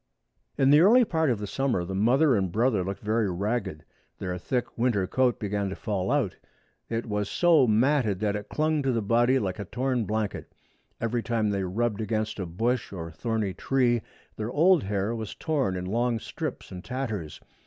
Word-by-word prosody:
In 135 +1 +4
the 150 - +7
early 230 +8 +6
part 160 -6 +1
of 120 - +1
the 105 - -5
summer 120 -5 -1
the 95 - -5
mother 125 +8 +3
and 95 -4 0
brother 110 -1 +2
looked 95 +3 -5
very 110 0 +1
ragged. 95 -3 -2 0.3
Their 90 -1 -4
thick 125 +5 -2
winter 115 -5 +1
coat 125 +5 +1
began 100 -1 -2
to 95 - -5
fall 100 -4 -2
out. - - 0 0.5
It 115 0 -2
was 105 -2 -2
so 165 -7 +4
matted 115 -2 +2
that 105 -1 0
it 105 0 -6
clung 155 0 +1
to 135 -1 +1
the 115 -3 0
body 120 +5 +3
like 95 -6 -2
a 100 - -4
torn 125 +2 -1
blanket. 110 0 -3 0.5
Every 115 +1 -1
time 110 -3 0
they 100 -1 -1
rubbed 105 +3 -1
against 110 0 -2
a 95 - -3
bush 115 +8 -1
or 85 -4 -6
thorny 105 +3 -2
tree 120 -1 +1 0.4
their 110 +1 -3
old 165 +5 +4
hair 100 +2 -1
was 110 -2 -5
torn 140 - -1
in 90 0 -4
long 120 +4 0
strips - - -6
and 90 0 -8
tatters. 115 - -4
110 Hz, 190 wpm, -27 LUFS, 100-125 Hz, 0.5 s, the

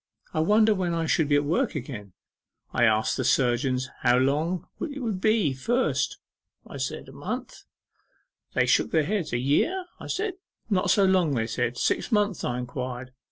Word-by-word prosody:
I - - 0
wonder 215 +6 +4
when 180 -4 -1
I 165 -1 0
shall 160 -1 +2
be 145 - +3
at 145 - +3
work 205 - 0
again? 115 -9 -6 0.6
I 120 - +4
asked 110 -1 +2
the 130 - -1
surgeons 130 +1 +1
how 120 -1 +4
long 150 +7 0
it 290 -3 -4
would 220 -7 -3
be 215 -10 +3
first. 240 - 0 0.5
I - - -9
said - - -4
a - - -11
month? - - -6 0.9
They - - +3
shook - - +3
their 160 -2 +2
heads. 185 +1 -2
A 120 - 0
year? 240 - +1
I - - -8
said. 410 0 -2 0.4
Not 190 -1 +2
so 195 +1 +5
long, 180 -6 +3
they 115 -2 0
said. 120 +1 -2
Six - - 0
months? 205 -4 +1
I 125 - -1
inquired. 125 0 -5
155 Hz, 180 wpm, -26 LUFS, 125-205 Hz, 0.9 s, so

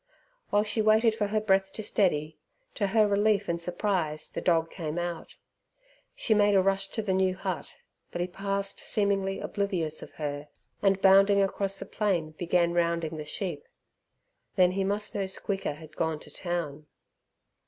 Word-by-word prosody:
While 205 0 +3
she 215 +1 0
waited 220 +1 +4
for 210 -2 -1
her 215 +1 +1
breath 195 -2 +2
to 215 - -4
steady, 160 -8 +1 0.3
to 200 - 0
her 215 +2 +4
relief 205 0 +2
and 170 0 -1
surprise 175 -4 -1
the - - -5
dog 165 -2 +2
came 160 -3 -4
out. 175 -1 -4 0.8
She 225 - +1
made 205 -1 +4
a 190 - +6
rush 195 0 +1
to 220 - -2
the 195 -2 0
new 185 0 +2
hut, 190 -2 -5 0.3
but - - -6
he 175 - +1
passed 195 +2 -2
seemingly 195 -2 0
oblivious 180 -7 -2
of - - -10
her, 145 -1 -4 0.3
and, 195 -1 +3
bounding 195 +1 +6
across 195 0 -1
the - - -5
plain, 180 -7 -1
began 170 +1 +1
rounding 170 -2 0
the 155 - -6
sheep. 170 0 -4 0.9
Then 180 -1 +5
he 195 +1 -1
must 205 +2 -1
know 195 -1 -1
Squeaker 190 -3 -3
had 155 +1 -13
gone 160 -2 -1
to - - -13
town. 160 -4 -4
190 Hz, 170 wpm, -28 LUFS, 170-200 Hz, 0.9 s, a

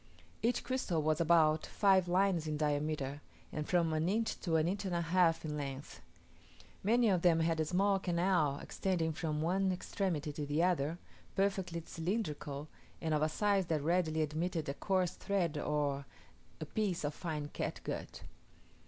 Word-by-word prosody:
Each 240 +1 +1
crystal 240 -9 -1
was 155 +1 +1
about 160 -2 +4
five 190 -3 +3
lines 180 -2 +2
in 155 -1 -1
diameter, 150 -1 -1 0.3
and 150 -1 -4
from 170 -3 +2
an 155 +3 +1
inch 220 +3 0
to 165 -4 -1
an 160 0 +3
inch 195 +3 -1
and 185 -3 -2
a 170 - +1
half 170 -1 +2
in 150 -1 -3
length. 140 -1 -6 0.8
Many 235 +4 +4
of 185 -3 +2
them 165 -2 +4
had 165 0 +1
a 155 - +2
small 195 +4 +2
canal 175 -5 +1
extending 170 -4 -1
from 155 -1 -2
one 190 +3 +2
extremity 175 -5 -2
to 150 - -4
the 150 +4 +1
other, 170 -3 +1 0.4
perfectly 190 -4 0
cylindrical, 155 -6 -3 0.3
and 160 -1 -1
of 150 - +2
a 155 - +2
size 200 +1 +1
that 155 -3 0
readily 160 -1 +2
admitted 160 +2 -2
a 140 - -1
coarse 185 +3 0
thread 185 -6 -1
or 145 -2 -1 0.5
a 155 - -4
piece 190 0 -1
of 145 0 -1
fine 150 -4 -4
catgut. - - -5
165 Hz, 165 wpm, -34 LUFS, 155-185 Hz, 0.8 s, about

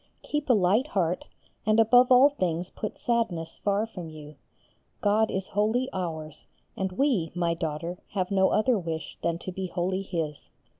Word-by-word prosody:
Keep 295 -2 -3
a - - +7
light 210 +6 +3
heart, 180 - -1 0.4
and 215 +1 +3
above 245 +3 +6
all 255 +3 +8
things 180 - -2
put 215 - -5
sadness 210 -9 -1
far 205 +1 +2
from 180 -7 -8
you. 150 -1 -10 0.7
God 215 +2 +2
is 190 0 -3
wholly 220 +6 +1
ours, 160 -4 -5 0.3
and 190 -1 -2
we, 215 - +1
my 170 -1 +1
daughter, 165 +1 -4
have 185 -1 -1
no 190 -1 +4
other 225 0 +2
wish 165 -2 -5
than 170 0 0
to 185 - -6
be 185 +1 -4
wholly 185 +2 -1
His. 165 -6 -4
190 Hz, 165 wpm, -27 LUFS, 170-220 Hz, 0.7 s, all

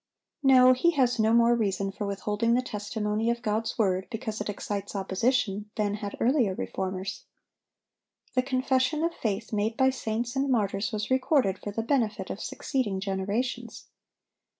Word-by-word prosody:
No; 255 -2 +7
he 255 +7 +3
has 255 -5 +2
no 220 0 +4
more 235 +1 +5
reason 200 -4 0
for 205 +1 -4
withholding 210 +3 0
the 250 - +1
testimony 210 0 -2
of 235 +1 -1
God's 220 0 -1
word, 190 -3 +1
because 220 -2 -4
it 210 - -3
excites 205 0 -4
opposition, 205 +1 0
than 210 -2 0
had 205 -1 -5
earlier 240 -6 +2
reformers. 190 +2 -4 1.1
The 255 - +3
confession 260 +3 +1
of 335 0 0
faith 220 -3 -3
made 215 +2 0
by 265 0 +4
saints 240 0 -3
and 270 +1 0
martyrs 210 -1 0
was 215 +2 -3
recorded 260 -7 +2
for - - -6
the 225 +2 -3
benefit 230 -4 0
of - - -5
succeeding 230 -9 -2
generations. 205 +5 -3
220 Hz, 155 wpm, -27 LUFS, 205-255 Hz, 1.1 s, No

